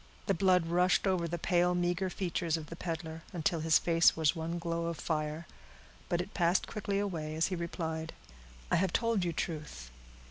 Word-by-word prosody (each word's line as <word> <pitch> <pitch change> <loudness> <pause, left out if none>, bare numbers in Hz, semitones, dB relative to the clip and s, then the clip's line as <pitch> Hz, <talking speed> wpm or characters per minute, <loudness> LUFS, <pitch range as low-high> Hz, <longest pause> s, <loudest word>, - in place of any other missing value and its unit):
The 195 - +2
blood 180 -1 +3
rushed 180 +3 +3
over 185 -3 +1
the 175 +1 -3
pale, 180 +1 +2
meager 175 +2 0
features 170 -3 -1
of 155 -1 -9
the - - -5
peddler, 165 -1 -5
until 170 -1 0
his 160 0 +4
face 165 -1 +4
was 155 -3 +3
one 165 +1 -3
glow 170 0 -2
of 170 -1 -3
fire; 155 0 -2 0.6
but 175 0 +1
it 185 - -8
passed 175 0 +2
quickly 200 -2 -3
away, 165 -7 -2
as 160 +3 +1
he 185 - -1
replied,— 160 -2 -4 0.6
"I - - +4
have 185 0 +1
told 230 -5 +1
you 175 - 0
truth. 150 - -5
170 Hz, 185 wpm, -32 LUFS, 160-180 Hz, 0.6 s, his